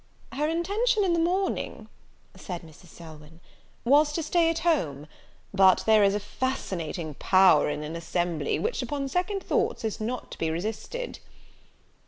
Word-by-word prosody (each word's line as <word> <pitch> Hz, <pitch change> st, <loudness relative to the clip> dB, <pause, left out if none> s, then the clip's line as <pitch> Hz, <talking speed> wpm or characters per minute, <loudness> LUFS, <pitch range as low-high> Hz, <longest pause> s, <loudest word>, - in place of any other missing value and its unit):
"Her 300 Hz, +3 st, -1 dB
intention 410 Hz, +7 st, +1 dB
in 365 Hz, -3 st, +2 dB
the 340 Hz, -, +2 dB
morning," 370 Hz, +4 st, -1 dB, 0.5 s
said 175 Hz, -4 st, -7 dB
Mrs. 165 Hz, +2 st, -16 dB
Selwyn, 160 Hz, -1 st, -13 dB, 0.5 s
"was 290 Hz, +4 st, +5 dB
to 330 Hz, -, -2 dB
stay 330 Hz, +1 st, +2 dB
at 330 Hz, -, -1 dB
home; 150 Hz, -, 0 dB, 0.5 s
but 190 Hz, -1 st, +5 dB
there 220 Hz, -1 st, +5 dB
is 200 Hz, 0 st, +3 dB
a -, -, 0 dB
fascinating 185 Hz, -, -4 dB
power 185 Hz, 0 st, +4 dB
in 150 Hz, 0 st, -3 dB
an 155 Hz, +2 st, -6 dB
assembly, 170 Hz, -1 st, -1 dB
which, 470 Hz, -, -2 dB
upon 285 Hz, -2 st, -3 dB
second 365 Hz, +6 st, -1 dB
thoughts, 445 Hz, -, 0 dB
is 220 Hz, 0 st, -3 dB
not 245 Hz, +4 st, -4 dB
to -, -, -9 dB
be 160 Hz, -, 0 dB
resisted." 220 Hz, -, -4 dB
220 Hz, 155 wpm, -27 LUFS, -, 0.5 s, was